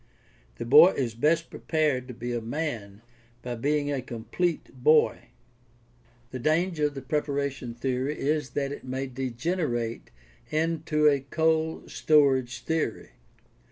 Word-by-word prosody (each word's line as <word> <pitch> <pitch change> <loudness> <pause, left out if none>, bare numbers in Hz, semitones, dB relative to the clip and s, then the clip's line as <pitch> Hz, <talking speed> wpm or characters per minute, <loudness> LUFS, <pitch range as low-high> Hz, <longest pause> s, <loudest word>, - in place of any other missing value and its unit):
The 120 - -5
boy 150 +9 +8
is 120 -4 -2
best 155 +8 +1
prepared 150 -6 0
to 125 - -8
be 120 +1 -4
a 120 - -2
man 115 -5 -4 0.4
by 125 - -4
being 145 +4 0
a 140 -2 -1
complete 130 +8 -3
boy. 155 +2 +4 1.1
The 130 - -5
danger 155 +2 +1
of 145 - -8
the 135 - -6
preparation 140 -3 -2
theory 130 +4 -2
is 150 -1 0
that 140 -1 0
it 145 - -7
may 130 +1 -3
degenerate 130 -1 -3 0.4
into 155 -1 +1
a 140 -2 +4
cold 160 +3 0
storage 135 -5 +3
theory. 160 -1 -2
140 Hz, 130 wpm, -27 LUFS, 125-155 Hz, 1.1 s, boy